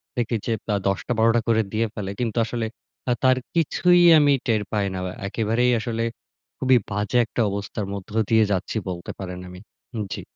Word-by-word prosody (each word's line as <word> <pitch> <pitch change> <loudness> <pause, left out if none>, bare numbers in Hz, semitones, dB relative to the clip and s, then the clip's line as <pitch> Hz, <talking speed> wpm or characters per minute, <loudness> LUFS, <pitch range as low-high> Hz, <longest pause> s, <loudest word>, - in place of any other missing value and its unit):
দেখি 120 -1 0
যে 115 - 0
বা 105 - +1
১০ 100 0 +1
টা-১২ 115 -2 +3
টা 120 - +3
করে 115 -1 +3
দিয়ে 115 +1 +1
ফেলে। 100 -3 -4
কিন্তু 120 -2 -2
আসলে 115 -1 -3 0.4
আ - - +4
তার 130 0 +5 0.2
কিছুই 175 +2 +4 0.2
আমি 145 -1 +5
টের 110 -3 +2
পাই 105 -2 +1
না। 95 - -3
বা 90 - -3 0.2
একেবারেই 115 +4 +1
আসলে 115 0 -2 0.5
খুবই 130 -1 +4
বাজে 105 +3 0
একটা 120 - -2
অবস্থার 100 +1 -4
মধ্য 100 +1 -7 0.2
দিয়ে 110 -1 +5
যাচ্ছি 100 +3 -1
বলতে 85 -1 -5
পারেন 90 -2 -6
আমি। 90 0 -10 0.4
উম 110 - -1
জি। - - -5
110 Hz, 190 wpm, -23 LUFS, 100-120 Hz, 0.5 s, তার